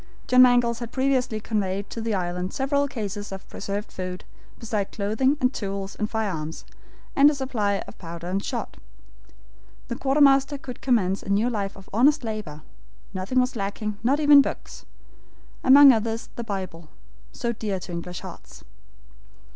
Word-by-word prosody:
John 255 0 +6
Mangles 245 -2 +4
had 235 -1 -6
previously 260 -4 0
conveyed 200 -2 -2
to 230 - -5
the 220 -2 -1
island 180 0 -3
several 280 +1 +1
cases 205 -5 -5
of 195 0 -8
preserved 200 +1 -5
food, 185 -1 -6 0.3
besides 215 -3 -2
clothing, 220 +8 +1
and 250 +1 +2
tools 195 -1 -4
and 210 - -2
firearms, 180 -9 -3 0.5
and 280 +1 +7
a 300 - -1
supply 220 -7 -1
of - - -13
powder 170 -1 -8
and 190 +3 -2
shot. - - -4 1.1
The 235 - -2
quartermaster 275 +1 +3
could 255 -3 -9
commence 200 -7 +1
a - - -9
new 210 +5 +2
life 200 -3 -3
of 190 - -14
honest 275 +6 +4
labor. 210 -10 -5 0.5
Nothing 190 +7 0
was 250 0 0
lacking, 205 0 -4
not 265 +6 +2
even 290 -2 +8
books; - - -6 0.8
among 275 +1 +9
others, 225 -1 -1
the 235 - -4
Bible, 185 -7 -6 0.4
so 235 -1 -3
dear 210 -4 -3
to 180 - -8
English 175 +1 -6
hearts. - - -11
220 Hz, 155 wpm, -25 LUFS, 195-255 Hz, 1.1 s, among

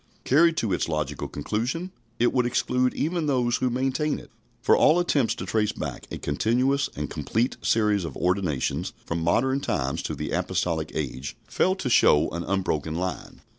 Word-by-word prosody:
Carried 165 +4 +4
to 105 -5 0
its 85 - -1
logical 75 -2 -2
conclusion, 125 - -3 0.3
it 120 - +2
would 125 -2 +2
exclude 125 +1 +1
even 165 0 -1
those 125 -4 +2
who 130 - 0
maintain 135 +5 0
it; - - -13 0.3
for - - +4
all 155 - +5
attempts 145 -8 +2
to - - -5
trace 105 -2 0
back - - -6
a - - -5
continuous 125 - +1
and 75 0 -3
complete 115 - -1
series 105 -3 +2
of 85 - -6
ordinations 90 -7 0
from 85 0 -2
modern 130 +11 +2
times 70 - -1
to - - -4
the - - -4
apostolic 80 -3 -1
age 65 -2 -4
fail 185 - +1
to 185 - -4
show 75 -10 +5
an 85 +1 -3
unbroken 80 -5 -1
line. 90 -1 -4
110 Hz, 170 wpm, -25 LUFS, 80-135 Hz, 0.3 s, all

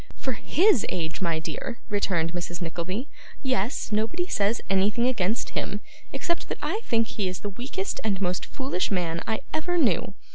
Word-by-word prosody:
'For 265 - -2
HIS 315 - +4
age, 165 +1 -2
my 170 -3 +2
dear!' 235 +9 -4
returned 175 -5 +1
Mrs. 175 -1 -3
Nickleby, 180 - -2 0.4
'yes; 245 -3 0
nobody 225 +12 +1
says 215 - +2
anything 200 +5 +3
against 225 -3 +1
him, 200 +1 -1 0.3
except 340 +5 -1
that - - -2
I 435 - -1
think 230 -1 +3
he 205 -3 -2
is 185 0 -3
the 205 - -2
weakest 265 - -3
and 200 -4 +1
most 180 -1 0
foolish 265 -9 -1
man 170 -4 0
I 220 -1 0
ever 350 +3 +1
knew. 200 - +3
205 Hz, 170 wpm, -27 LUFS, 180-255 Hz, 0.4 s, HIS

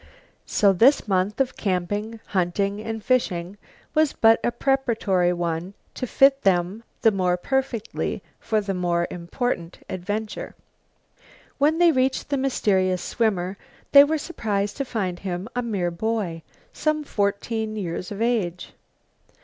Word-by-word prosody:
So 200 -2 +4
this 240 +8 +4
month 195 +3 0
of 265 -1 +1
camping, 205 +4 -2
hunting 195 +2 0
and 225 0 -5
fishing 200 -7 0 0.4
was 310 -2 +3
but 225 0 +5
a 240 - +1
preparatory 225 -10 +1
one 175 +2 -3 0.2
to 255 - -4
fit 275 +3 +4
them 190 +3 +1 0.2
the 225 - +6
more 180 -3 +1
perfectly 250 +1 -2 0.2
for 215 -1 0
the 200 -1 -3
more 175 -1 0
important 175 0 -3
adventure. 205 +4 -4 1.0
When 300 +3 +3
they 345 -1 +6
reached 260 -1 0
the 285 - +1
mysterious 190 -9 +1
swimmer 195 -4 -1 0.3
they 280 0 +10
were 310 +2 +1
surprised 210 -11 -2
to 275 - -2
find 190 -8 -3
him 185 +1 -4
a 245 - +1
mere 200 -7 -1
boy, 185 -3 -2 0.3
some 305 -1 0
fourteen 215 -1 -1
years 180 -2 -4
of 205 +2 -2
age. 200 -7 -1
210 Hz, 135 wpm, -24 LUFS, 180-245 Hz, 1.0 s, they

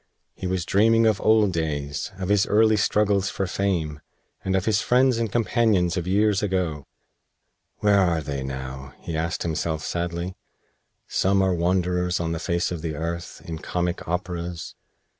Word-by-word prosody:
He 95 - -5
was 90 -2 -1
dreaming 115 +3 +4
of 110 -3 +2
old 110 -3 +4
days, 75 -3 -2
of 95 -1 -4
his 100 -1 +3
early 110 +1 +4
struggles 100 -1 +2
for 95 - -2
fame, 85 -6 -1 0.4
and 95 0 0
of 95 0 0
his 110 -1 +2
friends 125 -1 +3
and 115 -3 -1
companions 110 -6 +2
of 90 -2 -2
years 105 +2 +2
ago. 90 -8 -1 0.9
"Where 100 -1 +4
are 85 -4 +2
they 70 -2 -4
now?" 65 0 -6
he 85 - -5
asked 80 +1 -2
himself, 80 -1 -2
sadly. 85 +1 -3 0.7
"Some 95 0 +2
are 95 -1 +2
wanderers 90 0 +1
on 85 -1 -1
the 85 - -2
face 85 0 -1
of 85 -3 -4
the 80 -2 -3
earth, 85 +3 -5
in 80 -1 -5
comic 90 +1 -2
operas. 90 -1 -4
90 Hz, 160 wpm, -24 LUFS, 85-100 Hz, 0.9 s, dreaming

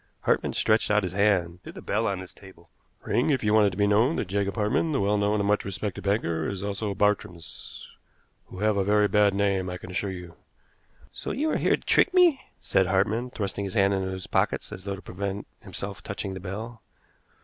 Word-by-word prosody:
Hartmann - - +1
stretched 110 +1 +2
out 105 0 +3
his 90 -1 -3
hand 95 -4 +1
to - - -8
the - - -10
bell 110 +2 -1
on 95 -2 -2
his 95 - -10
table. 95 -4 -16 0.3
"Ring 125 - +1
if 135 -5 +1
you 105 0 +2
want 110 -1 +6
it - - +3
to 90 - -9
be 100 - +3
known 110 +9 +3
that 105 - -2
Jacob 100 0 -1
Hartmann, 110 +9 +1
the 135 - +1
well 100 +1 +2
known 105 +1 +1
and 100 - 0
much 105 0 +2
respected 100 0 -4
banker, 85 -6 0
is 100 -1 -5
also 100 0 -3
Bartrams, 90 -5 -2 0.6
who 95 - -9
have 105 -1 +2
a 100 - +2
very 105 +1 +3
bad 105 -1 +3
name, 100 -2 +1
I 90 - -4
can 90 - -10
assure 95 +2 -2
you." 90 -2 -8 0.8
"So - - -6
you 310 +3 0
are - - +1
here - - +3
to - - -20
trick 390 - +3
me?" 345 -7 +5 0.2
said 95 - +1
Hartmann, 105 +6 +1
thrusting 100 -4 -3
his 95 - -6
hands 100 -2 +4
into 95 -1 -1
his 95 -1 -5
pockets - - 0
as 95 - -9
though 100 -1 -2
to 95 - -12
prevent 100 +2 -4
himself - - -6
touching 95 - -5
the 95 - -6
bell. 110 +5 -7
100 Hz, 225 wpm, -26 LUFS, 95-105 Hz, 0.8 s, want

